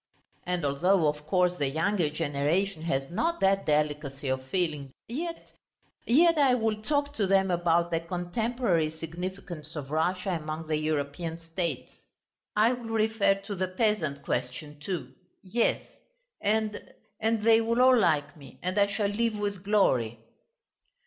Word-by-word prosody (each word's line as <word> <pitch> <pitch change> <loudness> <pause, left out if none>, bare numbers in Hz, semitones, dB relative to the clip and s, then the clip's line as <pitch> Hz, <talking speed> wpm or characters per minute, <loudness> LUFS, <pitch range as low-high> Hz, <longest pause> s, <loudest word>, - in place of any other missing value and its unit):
And 180 -3 -1
although, 165 +5 +3
of 150 0 -3
course, 180 +1 +2
the 140 -4 0
younger 165 +3 +1
generation 155 +4 -1
has 135 -4 -2
not 335 - 0
that 195 0 +2
delicacy 150 -2 0
of 130 0 -1
feeling, 150 -5 -2 0.2
yet... 330 +8 -5 0.6
yet 330 +5 +5
I 265 -3 +5
will 220 -3 -1
talk 285 +3 0
to 205 -3 +1
them 190 -1 +3
about 170 0 +2
the 165 - +1
contemporary 175 +1 -1
significance 165 0 -7
of 140 -2 -6
Russia 180 +5 0
among 155 +1 -5
the 155 -1 0
European 155 +2 -2
States. 165 +1 -4 0.6
I 220 +4 +4
will 240 -2 -7
refer 220 -2 +2
to 205 - -5
the 185 -1 -1
peasant 185 -7 0
question, 125 +4 -4
too; 150 -6 -5 0.3
yes, 225 +5 +1 0.6
and... 215 0 -1 0.2
and 220 0 0
they 225 0 +6
will 230 +1 0
all 255 0 +7
like 155 -9 +2
me 135 -5 -14
and 185 +3 0
I 200 - +5
shall 200 +1 0
leave 215 +2 0
with 200 -3 -3
glory!..." 130 - +2
180 Hz, 150 wpm, -28 LUFS, 155-215 Hz, 0.6 s, all